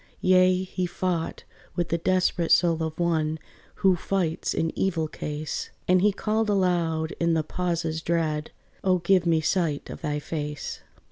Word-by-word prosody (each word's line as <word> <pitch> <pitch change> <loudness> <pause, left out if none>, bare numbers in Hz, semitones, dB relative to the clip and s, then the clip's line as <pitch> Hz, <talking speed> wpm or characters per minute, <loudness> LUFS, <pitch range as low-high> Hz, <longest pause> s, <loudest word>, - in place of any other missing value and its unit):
Yea, 185 0 +4
he 185 -1 -2
fought 175 -2 -2 0.3
with 175 -2 -1
the 170 - +1
desperate 180 -1 +1
soul 165 -2 +4
of 160 -1 -3
one 160 -2 +1 0.5
Who 190 -1 +6
fights 175 -2 -1
in 165 0 -1
evil 165 -5 0
case: 150 0 -4 0.2
And 180 0 +4
he 210 +2 +4
called 215 +2 0
aloud 170 -5 +1
in 170 -1 +2
the 160 - +1
pauses 165 -1 -2
dread, 160 -2 -1 0.3
"O 185 -1 +3
give 180 0 +2
me 165 -1 +3
sight 155 -3 0
of - - -8
thy 150 0 -1
face. 150 -1 -5
170 Hz, 155 wpm, -26 LUFS, 160-185 Hz, 0.5 s, Who